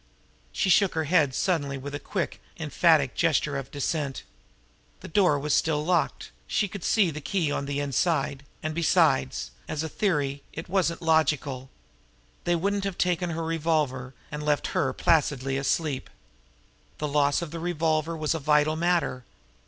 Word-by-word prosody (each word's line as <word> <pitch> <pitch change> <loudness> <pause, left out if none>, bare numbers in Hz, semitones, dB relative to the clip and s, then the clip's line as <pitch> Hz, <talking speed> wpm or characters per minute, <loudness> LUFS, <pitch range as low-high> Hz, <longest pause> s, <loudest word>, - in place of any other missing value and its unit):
She 190 - +1
shook 190 +1 +4
her 160 - +1
head 150 -4 +2
suddenly 145 -7 0
with 140 +2 -7
a 145 - -3
quick, 185 +5 -3 0.2
emphatic 160 -3 +3
gesture 150 -3 +1
of 135 -1 -4
dissent. 145 -1 -2 0.8
The - - -8
door 175 -4 +3
was 145 +1 -1
still 150 -2 +1
locked, 175 0 0 0.2
she 210 - +1
could 195 -1 -8
see 200 -7 +3
the 150 0 -7
key 155 +2 0
on 140 -1 -2
the 145 0 -2
inside; 140 -1 0 0.2
and, 155 0 -2
besides, 155 - +2 0.2
as 155 0 -3
a - - -2
theory, 145 -8 0
it 165 - -6
wasn't 175 -3 0
logical. 145 -5 +1 0.8
They 175 - +2
wouldn't 200 +3 0
have 195 -2 -3
taken 180 -1 +1
her 165 0 -3
revolver 150 -6 -1 0.2
and 150 0 -4
left 150 -1 +1
her 130 - +1
placidly 135 -3 +1
asleep! 140 +1 -1 0.9
The 150 - -2
loss 145 +2 +2
of 160 - -7
the 165 - -5
revolver 165 -1 0
was 155 0 0
a 165 - -2
vital 150 +1 +3
matter. 165 -7 0
155 Hz, 160 wpm, -26 LUFS, 140-170 Hz, 0.9 s, shook